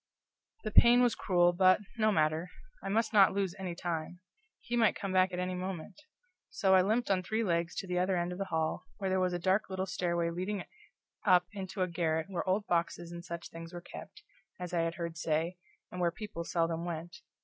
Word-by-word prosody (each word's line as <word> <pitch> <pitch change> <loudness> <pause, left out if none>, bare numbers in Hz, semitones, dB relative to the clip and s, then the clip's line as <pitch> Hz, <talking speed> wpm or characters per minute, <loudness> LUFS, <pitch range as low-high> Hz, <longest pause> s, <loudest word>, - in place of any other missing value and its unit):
The 215 - -3
pain 240 +3 +7
was 245 - +3
cruel, 175 -2 +3
but, 185 +1 +5 0.2
no 215 0 +4
matter, 155 0 +1 0.3
I - - -3
must 225 +3 +1
not 200 -3 +6
lose 195 -3 -1
any 180 -3 -4
time; 170 0 -4 0.4
he 240 - -4
might 230 -2 +4
come 195 -2 -4
back 185 0 +4
at 180 - -4
any 180 0 -2
moment; 180 -2 -5 0.6
so 190 -1 +2
I 190 - +7
limped 220 +3 +1
on 185 -1 +2
three 220 +5 -1
legs 170 -3 0
to - - -3
the 180 0 0
other 185 0 +1
end 175 +1 -1
of 180 - -6
the 195 - -1
hall, 160 -3 -2
where 195 -2 -2
there 190 - +2
was 185 -1 +1
a - - 0
dark 190 +4 +1
little 190 0 -2
stairway 170 -3 -1
leading 185 +3 -3 0.6
up 180 -3 +5
into 190 -1 -3
a - - 0
garret 165 0 -1
where 185 0 -2
old 200 +3 +1
boxes 170 -1 -1
and 170 0 -7
such 170 -1 -7
things 165 +1 -9
were 175 - -5
kept, 175 - -11 0.4
as 180 0 -6
I 175 - +2
had 165 0 -1
heard 170 -1 -5
say, 165 +2 -1 0.3
and 180 - -5
where 175 - +3
people 210 -1 -6
seldom 165 -1 0
went. 170 +2 -5
180 Hz, 215 wpm, -32 LUFS, 170-195 Hz, 0.6 s, pain